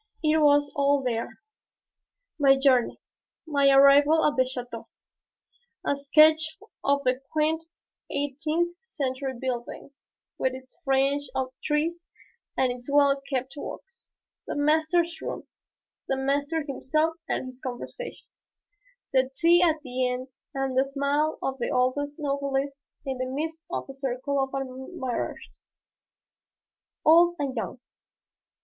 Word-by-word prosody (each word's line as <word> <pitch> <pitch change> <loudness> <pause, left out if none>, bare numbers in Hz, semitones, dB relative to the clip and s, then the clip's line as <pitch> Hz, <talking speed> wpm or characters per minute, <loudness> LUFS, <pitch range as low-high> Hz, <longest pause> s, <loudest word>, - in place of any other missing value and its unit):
It 310 +1 +3
was 290 -1 +4
all 280 -1 +2
there, 230 -2 -3 1.0
my 275 -1 +6
journey, 265 -3 +3 0.5
my 285 -3 +3
arrival 280 +3 +6
at 295 - +2
the 260 -1 +3
chateau, 245 -3 -5 1.0
a 285 - +2
sketch 310 +4 +4 0.3
of 280 0 +2
the 255 0 +1
quaint 315 +1 +1 0.4
eighteenth 305 +5 -1
century 265 - -3
building, 255 +2 -4 0.5
with 260 0 0
its 260 0 -12
fringe 275 0 +1
of 260 -1 -1
trees 330 +3 -1 0.5
and 255 -1 +2
its 245 +2 -8
well 280 -1 +4
kept 260 -1 -2
walks, 475 +10 -9 0.4
the - - -3
master's 315 +3 +1
room, - - -5 0.6
the 270 - 0
master 285 +4 0
himself 310 +3 0 0.2
and - - -1
his 255 0 -10
conversation; 265 - -7 0.9
the 260 -1 +3
tea 340 +2 +5
at 320 -3 +2
the 255 -1 -1
end 250 +1 -4 0.3
and 270 -1 -1
the 260 - +4
smile 280 +3 0
of 270 0 -2
the 240 - -1
old 250 0 +2 0.2
novelist 280 -1 -2 0.3
in 265 -2 -3
the 255 - -1
midst 320 +5 -4
of - - -4
a 270 - -8
circle 270 +1 -2
of 270 - -1
admirers, 260 0 -5 1.4
old 345 +2 +6
and 275 -2 -2
young. 235 +2 -4
280 Hz, 130 wpm, -26 LUFS, 260-305 Hz, 1.4 s, my